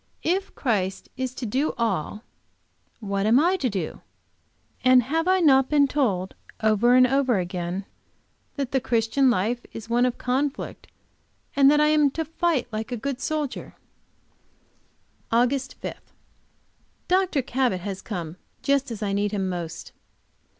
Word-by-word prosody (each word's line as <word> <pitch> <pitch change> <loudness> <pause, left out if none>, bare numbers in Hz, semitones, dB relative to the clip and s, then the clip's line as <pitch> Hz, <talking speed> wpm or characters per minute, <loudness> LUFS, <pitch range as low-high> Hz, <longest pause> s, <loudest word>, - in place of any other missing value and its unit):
If 380 +4 -1
Christ 195 -7 -1
is 260 -1 -4
to 250 - -5
do 265 +8 0
all, 215 -2 -2 0.8
what 200 -1 -1
am 235 +4 +5
I 350 +5 +3
to 265 -8 0
do? 190 -7 -4 0.8
And 255 -1 +6
have 325 +7 -1
I 375 0 +3
not 270 -5 +5
been 290 -2 +4
told, 205 -11 0 0.3
over 220 +3 +3
and 255 0 +7
over 265 -3 +2
again, 180 +1 -3 0.7
that 275 -3 -3
the 265 - +1
Christian 240 +2 +2
life 235 +3 0
is 225 +1 -8
one 245 +1 +3
of 245 - -3
conflict, 270 +3 -2 0.7
and 275 -1 +6
that 295 +1 +4
I 300 0 +4
am 300 -2 +4
to 320 - -1
fight 325 -3 0
like 220 +2 -4
a 245 - -2
good 270 +3 -4
soldier? 305 -3 -3 1.6
AUGUST 250 +3 +1
5. - - -4 1.1
Dr. 365 -6 +2
Cabot 250 -7 0
has 195 0 -5
come 175 -5 -6 0.3
just 280 -1 +1
as 225 -2 -5
I 200 -1 -1
need 205 0 0
him 195 -3 -1
most. 175 -3 -6
250 Hz, 150 wpm, -25 LUFS, 205-280 Hz, 1.6 s, and